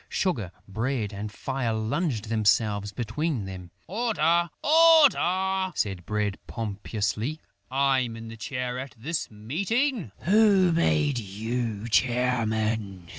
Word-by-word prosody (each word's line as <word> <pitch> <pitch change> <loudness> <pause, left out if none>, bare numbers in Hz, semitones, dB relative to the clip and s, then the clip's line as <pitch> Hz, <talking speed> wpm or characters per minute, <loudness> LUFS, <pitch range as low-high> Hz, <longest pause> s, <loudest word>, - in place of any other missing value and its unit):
Sugar, 120 - -1 0.2
Bread 110 +1 -2
and 105 +1 -5
Fire 130 0 -2
flung 110 +11 0
themselves 105 -1 +1
between 130 +1 -2
them: 95 -2 -8 0.2
"Order! 175 -6 +1
Order!" 190 - +4
said 95 -4 -2
Bread 105 -2 -1
pompously. 110 +5 -3 0.3
"I'm 130 -3 +1
in 115 0 -8
the 115 - -8
chair 125 +2 -4
at 135 +1 -7
this 155 +8 -3
meeting." 190 - -1
"Who 200 -2 +4
made 150 -5 +2
you 110 +1 -3
chairman?" 110 -5 0
120 Hz, 110 wpm, -26 LUFS, 105-170 Hz, 0.3 s, Order